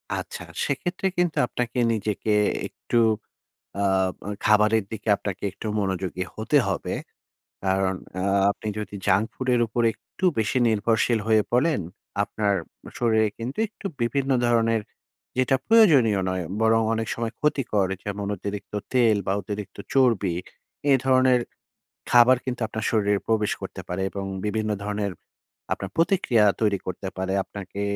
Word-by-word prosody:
আচ্ছা, - - -5 0.2
সেক্ষেত্রে 175 +7 -1
কিন্তু 175 -2 +1
আপনাকে 120 0 -3 0.2
নিজেকে 105 0 -1 0.3
একটু 120 - -1 0.8
আব 95 -1 +2 0.3
খাবারের 105 +1 +4
দিকে 110 0 -7
আপনাকে 100 -2 -5
একটু 100 - -7
মনোযোগী 95 -2 -2
হতে 110 +7 +2
হবে। - - -2 0.7
কারণ 95 0 +1 0.2
আ - - -1 0.3
আপনি 110 - -8
যদি 105 -1 -6
junk 100 +2 +3
ফুডের 125 -2 +1
উপর 120 +2 -1
একটু 185 - -16 0.2
বেশি 110 +3 0
নির্ভরশীল 110 +1 +2
হয়ে 110 -2 +4
পড়েন, 130 - +2 0.4
আপনার 105 0 0 0.4
শরীরে 110 -2 +3
কিন্তু 120 +4 -5
একটু 215 - -17 0.2
বিভিন্ন 135 +3 0
ধরনের 115 -2 +2 0.6
যেটা 130 +1 +3
প্রয়োজনীয় 150 - +6
নয় 95 -1 -2 0.2
বরং 110 0 +4
অনেক 110 0 -2
সময় 115 0 -3
ক্ষতিকর। 130 -10 +1 0.2
যেমন 100 0 -3
অতিরিক্ত 100 +2 -6 0.2
তেল 115 -4 +4
বা 95 - +2
অতিরিক্ত 100 -1 -6 0.2
চর্বি, 115 -10 +3 0.6
এ - - +7
ধরনের 130 -1 +4 0.7
খাবার 120 +1 +7
কিন্তু 125 -1 -3
আপনার 110 0 -5
শরীরে 105 -2 +2
প্রবেশ 110 -2 +2
করতে - - -6
পারে 90 +2 -2
এবং 100 0 -5 0.2
বিভিন্ন 110 0 -1
ধরনের 105 -1 -2 0.6
আপনার 100 - -5
প্রতিক্রিয়া 165 - +3 0.2
তৈরি 105 -3 +2
করতে 95 +2 -5
পারে। 95 0 -1
আপনাকে 100 0 -7
110 Hz, 135 wpm, -25 LUFS, 100-125 Hz, 0.8 s, এ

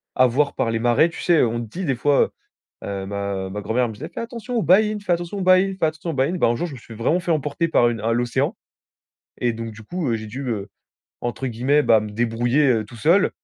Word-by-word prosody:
avoir 130 +3 +3
par - - -1
les 115 0 -1
marais. 120 +7 +3
Tu 165 - -8
sais, 175 -2 +3
heu, 125 - +4
on 115 +1 -2
te - - -8
dit 185 - -5
des 135 -4 +1
fois, 145 +3 +2 0.5
heu, 100 -1 -4
ma 100 -1 -3
ma 105 +2 -5
grand-mère 115 +5 0
me 110 - -6
disait: 150 +10 -8
«Fais - - -5
attention 235 +1 -6
aux 225 - +1
baïnes, 210 +4 +4
fais 185 -3 +1
attention 175 +3 -3
aux - - -3
baïnes, 185 +1 +4
fais - - +3
attention 155 +2 -3
aux - - -5
baïnes!». 140 +6 0
Ben - - +4
un 120 - +1
jour, 175 - -2
je 155 - -9
me 130 - -9
suis 115 - -12
vraiment 125 +10 +1
fait 175 - -1
emporter 150 +2 0
par 120 -6 +4
une 115 -3 -4
à 115 +2 0
l'océan 120 0 0 0.8
et 120 -1 +1
donc, 115 0 -6
du 110 +1 -12
coup, 170 +6 -3
heu, 115 - +1
j'ai 110 0 -7
dû, 125 +6 -6
heu, 105 -4 -3 0.5
entre 120 +2 -3
guillemets, 130 +5 +2
bah, 110 -6 +5
me 105 0 -6
débrouiller, 120 +6 +1
heu, 115 -4 +2
tout 110 +3 -13
seul 165 - +3
125 Hz, 265 wpm, -22 LUFS, 115-165 Hz, 0.8 s, bah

